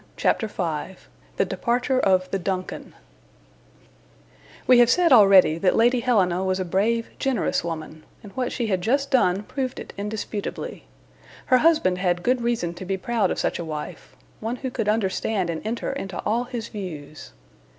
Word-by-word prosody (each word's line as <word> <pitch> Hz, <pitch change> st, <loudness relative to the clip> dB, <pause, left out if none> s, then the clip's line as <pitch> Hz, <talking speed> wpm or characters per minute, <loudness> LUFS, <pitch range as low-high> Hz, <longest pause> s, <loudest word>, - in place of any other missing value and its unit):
CHAPTER 220 Hz, -, +1 dB
V 175 Hz, -2 st, -4 dB, 0.4 s
THE -, -, +2 dB
DEPARTURE 245 Hz, +2 st, 0 dB
OF 185 Hz, -4 st, +2 dB
THE 195 Hz, -, -1 dB
"DUNCAN" 185 Hz, 0 st, -4 dB, 1.7 s
WE 250 Hz, -1 st, +6 dB
have 240 Hz, -1 st, +6 dB
said 345 Hz, +1 st, +4 dB
already 195 Hz, -7 st, +6 dB
that 185 Hz, +1 st, +2 dB
Lady 240 Hz, +2 st, +4 dB
Helena 190 Hz, -7 st, +2 dB
was 190 Hz, 0 st, 0 dB
a 185 Hz, -, -1 dB
brave, 220 Hz, +6 st, 0 dB
generous 265 Hz, -6 st, 0 dB
woman, 155 Hz, -2 st, -6 dB, 0.2 s
and 205 Hz, -, -11 dB
what 255 Hz, +1 st, -2 dB
she 240 Hz, -, -2 dB
had 190 Hz, -4 st, 0 dB
just 275 Hz, +8 st, 0 dB
done 195 Hz, -7 st, +3 dB
proved 260 Hz, +3 st, -4 dB
it -, -, -9 dB
in 205 Hz, +1 st, -3 dB
disputably. 210 Hz, -1 st, -5 dB, 0.6 s
Her 255 Hz, -, +5 dB
husband 305 Hz, -, +3 dB
had 175 Hz, -2 st, 0 dB
good 250 Hz, +2 st, +1 dB
reason 235 Hz, -8 st, -1 dB
to 175 Hz, -, -9 dB
be 190 Hz, +1 st, -2 dB
proud 225 Hz, +2 st, 0 dB
of -, -, -2 dB
such -, -, -1 dB
a -, -, -3 dB
wife, 155 Hz, -2 st, -7 dB, 0.2 s
one 225 Hz, +3 st, -3 dB
who 260 Hz, 0 st, -5 dB
could 225 Hz, -4 st, -1 dB
understand 200 Hz, -3 st, 0 dB
and 160 Hz, -, -5 dB
enter 230 Hz, +5 st, -3 dB
into 195 Hz, -9 st, -5 dB
all 235 Hz, +4 st, 0 dB
his 235 Hz, -2 st, -6 dB
views. 155 Hz, -, -8 dB
205 Hz, 170 wpm, -24 LUFS, 185-240 Hz, 1.7 s, WE